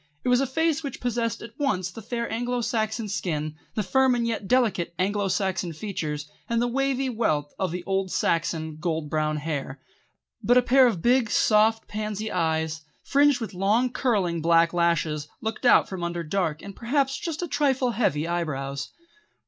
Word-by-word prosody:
It -, -, 0 dB
was 250 Hz, +1 st, +4 dB
a 275 Hz, -, 0 dB
face 320 Hz, +3 st, +1 dB
which 280 Hz, -3 st, -6 dB
possessed 235 Hz, -1 st, -2 dB
at 230 Hz, -1 st, -10 dB
once 185 Hz, -11 st, 0 dB
the 225 Hz, -, -9 dB
fair 235 Hz, +2 st, -3 dB
Anglo 245 Hz, +1 st, -1 dB
Saxon 220 Hz, -1 st, -1 dB
skin, 155 Hz, -6 st, -2 dB, 0.2 s
the 215 Hz, -, 0 dB
firm 260 Hz, +6 st, +3 dB
and 235 Hz, -1 st, 0 dB
yet 225 Hz, -4 st, -2 dB
delicate 220 Hz, -9 st, +1 dB
Anglo 200 Hz, +2 st, 0 dB
Saxon 190 Hz, -3 st, -1 dB
features, 155 Hz, -5 st, -4 dB, 0.2 s
and 230 Hz, 0 st, +1 dB
the 240 Hz, -, +1 dB
wavy 270 Hz, +1 st, 0 dB
wealth 155 Hz, -, -1 dB
of 190 Hz, -, 0 dB
the 175 Hz, +1 st, -5 dB
old 195 Hz, 0 st, -1 dB
Saxon 160 Hz, -3 st, -1 dB
gold 160 Hz, -2 st, -2 dB
brown 155 Hz, 0 st, 0 dB
hair; 145 Hz, -3 st, -4 dB, 0.6 s
but 245 Hz, +1 st, +4 dB
a 250 Hz, -, +5 dB
pair 260 Hz, +1 st, +6 dB
of 185 Hz, -9 st, -2 dB
big, 245 Hz, -2 st, +3 dB
soft, 220 Hz, +1 st, +3 dB
pansy 215 Hz, 0 st, -4 dB
eyes, 160 Hz, -2 st, 0 dB, 0.2 s
fringed 285 Hz, -2 st, +3 dB
with 225 Hz, -4 st, -5 dB
long, 210 Hz, +7 st, +2 dB
curling, 190 Hz, -11 st, 0 dB
black 165 Hz, +1 st, +4 dB
lashes, 165 Hz, -3 st, +1 dB
looked 220 Hz, +3 st, -2 dB
out -, -, +6 dB
from 185 Hz, -3 st, -5 dB
under 170 Hz, 0 st, -2 dB
dark 160 Hz, -2 st, -1 dB
and 200 Hz, -1 st, -8 dB
perhaps 270 Hz, +3 st, 0 dB
just 330 Hz, -1 st, -4 dB
a -, -, -2 dB
trifle 265 Hz, -4 st, +1 dB
heavy 165 Hz, -, 0 dB
eyebrows. 140 Hz, -5 st, -3 dB
205 Hz, 180 wpm, -25 LUFS, 165-245 Hz, 0.6 s, pair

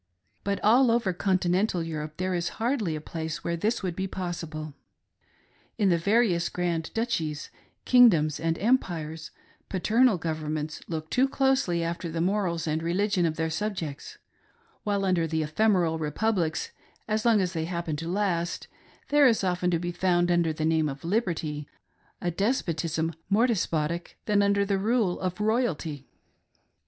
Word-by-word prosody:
But 200 Hz, -1 st, -1 dB
all 240 Hz, +4 st, +5 dB
over 230 Hz, -5 st, +2 dB
continental 185 Hz, 0 st, +1 dB
Europe 155 Hz, -2 st, -5 dB
there 185 Hz, 0 st, -1 dB
is 175 Hz, -1 st, -1 dB
hardly 225 Hz, -, 0 dB
a -, -, -4 dB
place 160 Hz, 0 st, -5 dB
where 170 Hz, -, -1 dB
this 215 Hz, +6 st, -1 dB
would 180 Hz, -3 st, -2 dB
be 190 Hz, +1 st, -2 dB
possible. 165 Hz, -5 st, -5 dB, 1.0 s
In 205 Hz, -3 st, +3 dB
the 170 Hz, -, +3 dB
various 190 Hz, -3 st, +2 dB
grand 170 Hz, -2 st, -2 dB
duchies, 165 Hz, -11 st, -2 dB, 0.3 s
king 245 Hz, -1 st, +8 dB
doms, 155 Hz, -5 st, 0 dB
and 165 Hz, 0 st, 0 dB
empires, 165 Hz, -8 st, -1 dB, 0.4 s
paternal 220 Hz, +4 st, +3 dB
governments 155 Hz, -2 st, -3 dB
look 160 Hz, -2 st, -5 dB
too 260 Hz, +2 st, +3 dB
closely 265 Hz, -12 st, +1 dB
after 170 Hz, +1 st, -3 dB
the 165 Hz, +1 st, -3 dB
morals 175 Hz, -2 st, 0 dB
and 155 Hz, 0 st, -1 dB
religion 180 Hz, +1 st, +1 dB
of 155 Hz, -, -2 dB
their 160 Hz, 0 st, -1 dB
subjects; 160 Hz, -5 st, -4 dB, 0.7 s
while 200 Hz, -1 st, 0 dB
under 175 Hz, -3 st, +2 dB
the 160 Hz, 0 st, -1 dB
ephemeral 170 Hz, 0 st, +2 dB
republics, 160 Hz, +1 st, -1 dB, 0.4 s
as 215 Hz, 0 st, 0 dB
long 230 Hz, -3 st, +4 dB
as 185 Hz, -1 st, 0 dB
they 160 Hz, -2 st, -2 dB
happen 170 Hz, -2 st, -3 dB
to 165 Hz, +2 st, -5 dB
last, 180 Hz, -3 st, -1 dB, 0.4 s
there 290 Hz, -1 st, +6 dB
is 225 Hz, -4 st, +2 dB
often 180 Hz, -1 st, +1 dB
to 170 Hz, -, +2 dB
be 175 Hz, +1 st, -3 dB
found, 175 Hz, -1 st, +2 dB
under 170 Hz, -2 st, +2 dB
the 155 Hz, 0 st, -2 dB
name 160 Hz, -1 st, +2 dB
of 140 Hz, +3 st, -8 dB
liberty, 165 Hz, -7 st, -1 dB, 0.5 s
a 175 Hz, -, -1 dB
despotism 165 Hz, -, -1 dB, 0.2 s
more 215 Hz, +4 st, +4 dB
despotic 170 Hz, -7 st, -1 dB
than 205 Hz, -1 st, +3 dB
under 200 Hz, 0 st, +2 dB
the 195 Hz, -1 st, 0 dB
rule 215 Hz, -3 st, +1 dB
of 185 Hz, +1 st, -3 dB
royalty. 195 Hz, -, -1 dB
175 Hz, 155 wpm, -27 LUFS, 160-205 Hz, 1.0 s, king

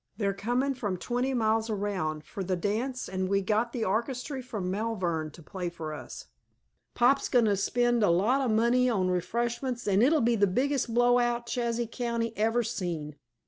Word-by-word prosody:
"They're 200 Hz, -2 st, 0 dB
comin' 245 Hz, +7 st, 0 dB
from 205 Hz, -8 st, -3 dB
twenty 245 Hz, +7 st, -1 dB
mile 220 Hz, -1 st, +2 dB
around, 195 Hz, -7 st, -2 dB
fer 200 Hz, -, -7 dB
the 185 Hz, 0 st, -1 dB
dance, 225 Hz, +8 st, -2 dB
an' 185 Hz, 0 st, -2 dB
we've 195 Hz, 0 st, +1 dB
got 220 Hz, +3 st, +1 dB
the 235 Hz, -3 st, -2 dB
orchestry 250 Hz, +6 st, -2 dB
from 215 Hz, -8 st, -4 dB
Malvern 185 Hz, -7 st, -1 dB
to 160 Hz, +2 st, -14 dB
play 180 Hz, +1 st, -4 dB
for 160 Hz, -3 st, -6 dB
us. 150 Hz, -, -8 dB, 0.7 s
Pop's 260 Hz, +3 st, +3 dB
goin' 245 Hz, -3 st, +4 dB
to 205 Hz, -2 st, +3 dB
spend 240 Hz, +4 st, +1 dB
a 205 Hz, -, +4 dB
lot 210 Hz, +11 st, +3 dB
of 260 Hz, -, 0 dB
money 235 Hz, +3 st, +3 dB
on 190 Hz, -6 st, +1 dB
refreshments 235 Hz, +7 st, -2 dB
an' 200 Hz, 0 st, +3 dB
it'll 300 Hz, +6 st, +4 dB
be 235 Hz, -1 st, +2 dB
the 205 Hz, -2 st, +3 dB
biggest 255 Hz, +5 st, 0 dB
blow 245 Hz, +1 st, +4 dB
out 240 Hz, 0 st, 0 dB
Chazy 235 Hz, 0 st, -1 dB
County 230 Hz, -1 st, -2 dB
ever 225 Hz, +3 st, +1 dB
seen!" 175 Hz, -10 st, -4 dB
225 Hz, 185 wpm, -28 LUFS, 190-245 Hz, 0.7 s, goin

